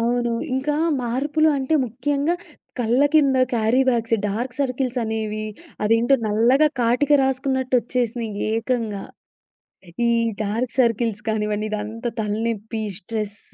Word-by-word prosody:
అవును. 240 0 +1 0.2
ఇంకా 280 +3 0 0.3
మార్పులు 290 +6 +1
అంటే 270 +4 0
ముఖ్యంగా 280 +7 -1 0.4
కళ్ళ 240 +2 +2
కింద 280 -4 +5 0.2
క్యారీ 230 +3 +3
బ్యాగ్స్, 230 -2 +2
డార్క్ 240 +5 -3
సర్కిల్స్ 255 -1 -1
అనేవి 215 -1 -3 0.4
అదేంటో 230 +5 +4
నల్లగా 240 +8 +4
కాటిక 250 +5 +2
రాసుకున్నట్టు 265 0 0
వచ్చేసినాయి. 235 -1 -2 0.2
ఏకంగా 225 -3 -1 1.0
ఈ - - +3 0.3
డార్క్ 225 +4 -2
సర్కిల్స్ 230 -3 +2
కానివ్వండి, 210 -1 -1
ఇదంతా 215 +3 -4
తలనొప్పి, 220 +1 -2 0.2
స్ట్రెస్ 210 +1 -5
235 Hz, 110 wpm, -22 LUFS, 220-260 Hz, 1.0 s, కింద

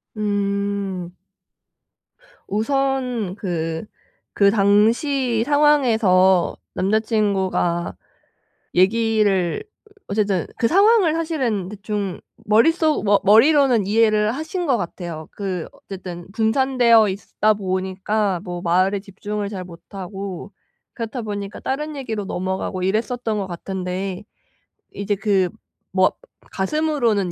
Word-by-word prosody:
음. 200 -3 -2 1.3
우선 250 -2 -1
그 165 -3 -3 0.5
그 200 -1 +5
당시 225 +5 +2
상황에서 225 - +3 0.2
남자 200 +4 +1
친구가 195 -6 0 0.8
얘기를 205 - +2 0.4
어쨌든 200 -4 0
그 230 - +3
상황을 395 - +4
사실은 260 - -1
대충 205 -2 -4 0.2
머릿속 310 +9 +3
머 205 -1 +4
머리로는 240 0 +5
이해를 215 0 +3
하신 320 +5 -4
것 260 -4 +3
같아요. 170 -4 -6
그 185 -5 -4
어쨌든 180 -3 -9
분산되어 230 -1 +4
있다 210 +2 0
보니까 190 0 -1
뭐 175 -3 -5
말에 185 +3 +2
집중을 205 +1 -5
잘 195 -3 -5
못하고 190 +2 -8 0.4
그렇다 230 +1 -5
보니까 205 -1 -5
다른 300 +3 -3
얘기로 225 -7 -4
넘어가고 185 0 -3
이랬었던 220 +2 -1
것 195 - -3
같은데 185 +2 -4 0.7
이제 205 +1 -1
그 195 -3 +1 0.5
뭐 185 0 +5 0.4
가슴으로는 230 - 0
205 Hz, 225 characters per minute, -21 LUFS, 190-230 Hz, 1.3 s, 그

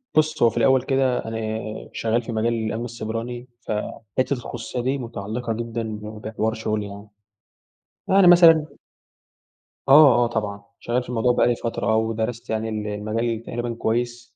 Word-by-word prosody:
بُص، 155 -1 +2
هو 115 - +7
في 115 - -8
الأول 130 +3 +4
كده 135 -1 0
أنا 115 0 -4 0.6
شغّال 115 +1 0
في 120 - -7
مجال 115 +1 0
الأمن 115 +1 -2
السيبراني، 120 +1 -5
ف - - -6 0.5
حِتّة 130 +2 +2
الخصوصية 120 -1 -5
دي 130 +3 0
متعلّقة 115 -1 -4
جدًا 115 0 -4
ب 110 -1 -5 0.2
بحوار 110 0 -2
شُغلي 110 -2 -2
يعني. 100 +1 -10 1.0
يعني 190 -1 +5
مثلًا 165 -3 +7 1.2
آه، 140 0 +8
آه، - - 0
طبعًا 105 -3 -3 0.2
شغّال 120 +1 -1
في 125 - -13
الموضوع 125 0 +2
بقى - - +3
لي 120 - +2
فترة 115 -1 -1
و 110 0 +1
درَست 115 +1 -4
يعني 110 0 -1
ال 105 -1 -3
المجال 110 +2 -2
تقريبًا 120 0 -4
كويس 120 +1 -2
115 Hz, 165 wpm, -23 LUFS, 110-125 Hz, 1.2 s, آه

